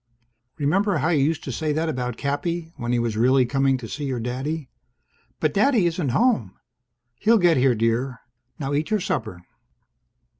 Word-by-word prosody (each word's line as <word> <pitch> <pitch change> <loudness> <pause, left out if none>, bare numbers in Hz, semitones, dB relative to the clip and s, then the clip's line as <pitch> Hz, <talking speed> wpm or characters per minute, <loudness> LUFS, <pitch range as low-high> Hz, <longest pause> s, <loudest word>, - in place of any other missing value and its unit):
"Remember 185 +6 +1
how 150 +3 0
you 150 -5 +3
used 160 +2 0
to 135 - -4
say 155 +5 -2
that 160 +2 -1
about 125 -5 -3
Cappy? 160 +4 -3
When 120 0 -3
he 125 - +2
was 115 -2 -1
really 130 +3 +4
coming 135 +1 +1
to 120 -3 -8
see 145 +5 -5
your 130 -3 -2
daddy?" 130 +5 -3 0.7
"But 155 - +1
Daddy 220 -2 +3
isn't 170 -4 0
home!" 130 - +1 0.6
"He'll 225 +2 +4
get 175 -6 +4
here, 130 -1 +3
dear. 115 +3 0 0.4
Now 140 -1 -3
eat 150 +2 0
your 215 -1 +1
supper." 110 - -3
140 Hz, 175 wpm, -23 LUFS, 125-165 Hz, 0.7 s, really